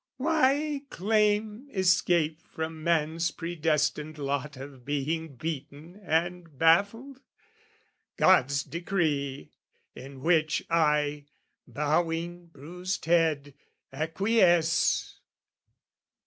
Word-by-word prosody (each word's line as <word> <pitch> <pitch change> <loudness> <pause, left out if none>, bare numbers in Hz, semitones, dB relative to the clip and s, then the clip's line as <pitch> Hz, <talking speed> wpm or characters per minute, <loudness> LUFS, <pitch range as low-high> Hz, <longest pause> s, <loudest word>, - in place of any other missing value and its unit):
"Why 295 0 +1
claim 210 +4 0
escape 175 - +2
from 160 0 -6
man's 165 0 +1
predestined 155 -2 -1
lot 140 0 -3
"Of 135 -1 -10
being 145 +2 -3
beaten 155 - -7
and 170 -2 -2
baffled? 205 - +2 1.0
God's 140 -6 +4
decree, 150 - -2 0.4
"In 135 +1 -11
which 160 -1 +2
I, 150 -3 +1 0.4
bowing 165 +3 -1
bruised 175 +5 -6
head, 160 -4 +1 0.4
acquiesce. 170 +2 +2
165 Hz, 75 wpm, -28 LUFS, 150-180 Hz, 1.0 s, God's